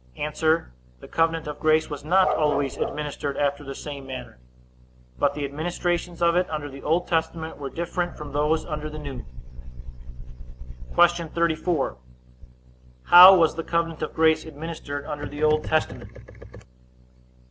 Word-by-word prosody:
A. 150 Hz, -, -2 dB
The 60 Hz, -, -2 dB
covenant 165 Hz, 0 st, 0 dB
of 150 Hz, -1 st, -6 dB
grace 155 Hz, 0 st, +2 dB
was 145 Hz, -1 st, -7 dB
not 185 Hz, +4 st, +4 dB
always 145 Hz, -3 st, 0 dB
administered 145 Hz, -1 st, -4 dB
after 145 Hz, 0 st, -1 dB
the 135 Hz, -1 st, -7 dB
same 140 Hz, -3 st, -8 dB
manner, 125 Hz, -, -8 dB, 0.8 s
but 140 Hz, 0 st, +1 dB
the 145 Hz, -1 st, -3 dB
administrations 175 Hz, +4 st, -3 dB
of 170 Hz, 0 st, +3 dB
it 180 Hz, +1 st, +1 dB
under 150 Hz, -2 st, -5 dB
the 135 Hz, 0 st, -10 dB
Old 170 Hz, +4 st, 0 dB
Testament 160 Hz, -1 st, -2 dB
were 140 Hz, -1 st, -5 dB
different 175 Hz, +2 st, -3 dB
from 150 Hz, -1 st, -8 dB
those 150 Hz, +3 st, 0 dB
under 155 Hz, -1 st, -5 dB
the 155 Hz, -, -8 dB
New. 140 Hz, -5 st, -7 dB, 1.7 s
Q. 175 Hz, -1 st, +4 dB
34. 165 Hz, -, -1 dB, 1.1 s
How 180 Hz, +2 st, +10 dB
was 165 Hz, -4 st, +3 dB
the 165 Hz, -, -5 dB
covenant 165 Hz, -1 st, -2 dB
of -, -, -4 dB
grace 160 Hz, 0 st, +3 dB
administered 150 Hz, -2 st, -7 dB
under 145 Hz, 0 st, -5 dB
the 145 Hz, +1 st, -6 dB
Old 155 Hz, 0 st, +2 dB
Testament? 155 Hz, 0 st, -1 dB
155 Hz, 145 wpm, -24 LUFS, 145-165 Hz, 1.7 s, How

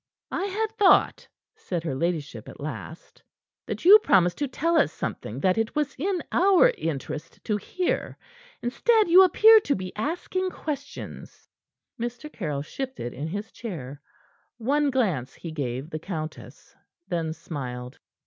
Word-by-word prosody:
"I 385 Hz, -, -1 dB
had 425 Hz, +2 st, -2 dB
thought," 395 Hz, -2 st, +4 dB, 0.3 s
said 175 Hz, -3 st, -4 dB
her 160 Hz, -, -2 dB
ladyship 145 Hz, -6 st, -3 dB
at -, -, -12 dB
last, 155 Hz, +2 st, -8 dB, 0.5 s
"that -, -, -5 dB
you 410 Hz, +4 st, +10 dB
promised 180 Hz, -, +3 dB
to 290 Hz, -, 0 dB
tell 335 Hz, +6 st, 0 dB
us 295 Hz, -, +4 dB
something 115 Hz, +6 st, -5 dB
that 185 Hz, +5 st, +2 dB
it 225 Hz, 0 st, -1 dB
was 295 Hz, -2 st, 0 dB
in 360 Hz, +4 st, -1 dB
our 390 Hz, +6 st, +5 dB
interest 155 Hz, -, -5 dB
to 215 Hz, -, 0 dB
hear. 360 Hz, -, -2 dB, 0.5 s
Instead, 430 Hz, -, +3 dB
you 360 Hz, +3 st, +9 dB
appear 440 Hz, +5 st, +7 dB
to 290 Hz, -9 st, 0 dB
be 185 Hz, -1 st, -6 dB
asking 355 Hz, -, -2 dB
questions." 290 Hz, -5 st, -7 dB, 0.5 s
Mr. 240 Hz, +6 st, -5 dB
Caryll 150 Hz, -8 st, -3 dB
shifted 260 Hz, -, -5 dB
in 145 Hz, +5 st, -5 dB
his 205 Hz, +6 st, -5 dB
chair. 145 Hz, -, -7 dB, 0.6 s
One 285 Hz, +5 st, +1 dB
glance 190 Hz, -, 0 dB
he 165 Hz, -, -8 dB
gave 135 Hz, 0 st, -4 dB
the 155 Hz, -, -4 dB
countess, 155 Hz, -3 st, -7 dB, 0.3 s
then 165 Hz, -2 st, -2 dB
smiled. 125 Hz, -6 st, -7 dB
210 Hz, 145 wpm, -26 LUFS, -, 0.6 s, you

